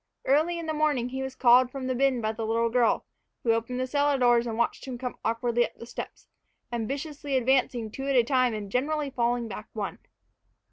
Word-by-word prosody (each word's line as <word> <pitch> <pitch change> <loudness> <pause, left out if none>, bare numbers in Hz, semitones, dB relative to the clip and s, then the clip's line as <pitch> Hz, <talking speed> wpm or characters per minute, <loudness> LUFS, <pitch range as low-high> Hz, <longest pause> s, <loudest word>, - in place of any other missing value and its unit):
Early 310 +6 +2
in 335 - -5
the 315 - -2
morning 295 -5 +1
he 265 +1 -4
was 265 0 -5
called 250 0 +5
from 265 0 -6
the 255 - 0
bin 260 -1 +2
by 215 0 0
the 225 +1 -5
little 230 +1 +1
girl, 240 -1 +2 0.4
who 230 - +3
opened 230 +2 -1
the 255 - 0
cellar 285 +1 +1
doors 240 -2 +4
and 225 -1 -3
watched 235 - -1
him 255 -2 -5
come 250 0 -4
awkwardly 235 +1 +1
up - - -5
the - - -10
steps, 235 - -8 0.5
ambitiously 275 +4 -2
advancing 250 -3 +1
two 270 +4 -5
at 275 - +1
a 245 - +6
time 255 -2 +2
and 205 -2 -6
generally 290 +3 0
falling 240 -1 0
back 210 0 -7
one. 210 -3 -4
250 Hz, 215 wpm, -27 LUFS, 235-270 Hz, 0.5 s, a